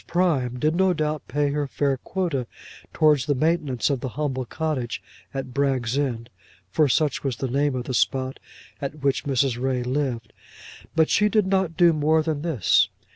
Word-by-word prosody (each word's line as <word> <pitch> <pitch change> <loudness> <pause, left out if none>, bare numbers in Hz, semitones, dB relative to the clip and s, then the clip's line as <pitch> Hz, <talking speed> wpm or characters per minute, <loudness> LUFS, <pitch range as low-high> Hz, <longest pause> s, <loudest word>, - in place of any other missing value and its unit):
Prime 150 -9 +1
did 155 +5 +1
no 190 0 +3
doubt 155 -2 -2
pay 145 -1 0
her 145 0 -1
fair 140 +1 0
quota 150 -5 -2 0.4
towards 150 -5 +3
the 145 - +2
maintenance 145 -5 +1
of 135 - 0
the 130 - -4
humble 135 -4 -1
cottage 145 -4 -3 0.3
at 135 -2 -5
Bragg's 135 -4 0
End, 120 -5 -2 0.4
for 155 -3 +3
such 150 +1 +1
was 135 -3 -1
the 130 +4 -3
name 140 +2 +1
of 125 - -2
the 130 - -5
spot 130 +1 0 0.4
at 140 +1 -5
which 140 -1 +1
Mrs. 130 -3 +1
Ray 130 -1 0
lived. 125 -4 -2 0.6
But 160 -1 +3
she 210 0 +4
did 215 -2 +2
not 190 -4 0
do 170 -2 +6
more 155 +1 +2
than 155 -2 -2
this. 155 - +3
140 Hz, 180 wpm, -24 LUFS, 130-155 Hz, 0.6 s, do